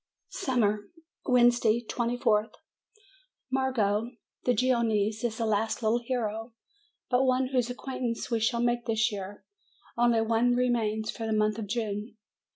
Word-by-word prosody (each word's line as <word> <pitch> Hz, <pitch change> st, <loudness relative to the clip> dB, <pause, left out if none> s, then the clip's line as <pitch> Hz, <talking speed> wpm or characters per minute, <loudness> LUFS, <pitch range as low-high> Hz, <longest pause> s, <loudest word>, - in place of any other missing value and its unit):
SUMMER 215 Hz, -5 st, 0 dB, 0.4 s
Wednesday, 240 Hz, -2 st, +4 dB
24th. 230 Hz, -3 st, 0 dB, 1.0 s
Marco, 235 Hz, -5 st, +1 dB, 0.4 s
the 250 Hz, -, +4 dB
Genoese, 220 Hz, -3 st, +1 dB
is 225 Hz, -2 st, -1 dB
the 230 Hz, -, -1 dB
last 220 Hz, +2 st, 0 dB
little 220 Hz, +2 st, +2 dB
hero 230 Hz, -2 st, -3 dB, 0.6 s
but 250 Hz, +1 st, +4 dB
one 255 Hz, 0 st, +2 dB
whose 250 Hz, -3 st, 0 dB
acquaintance 245 Hz, -1 st, -4 dB
we 230 Hz, -, +2 dB
shall 235 Hz, +2 st, +1 dB
make 240 Hz, 0 st, 0 dB
this 220 Hz, +1 st, +2 dB
year; 200 Hz, 0 st, -7 dB, 0.5 s
only 235 Hz, -1 st, +3 dB
one 230 Hz, +2 st, +2 dB
remains 225 Hz, -3 st, 0 dB
for 225 Hz, -, -5 dB
the 220 Hz, -, 0 dB
month 215 Hz, 0 st, +1 dB
of 215 Hz, -, -5 dB
June. 215 Hz, 0 st, -3 dB
230 Hz, 135 wpm, -28 LUFS, 215-245 Hz, 1.0 s, Wednesday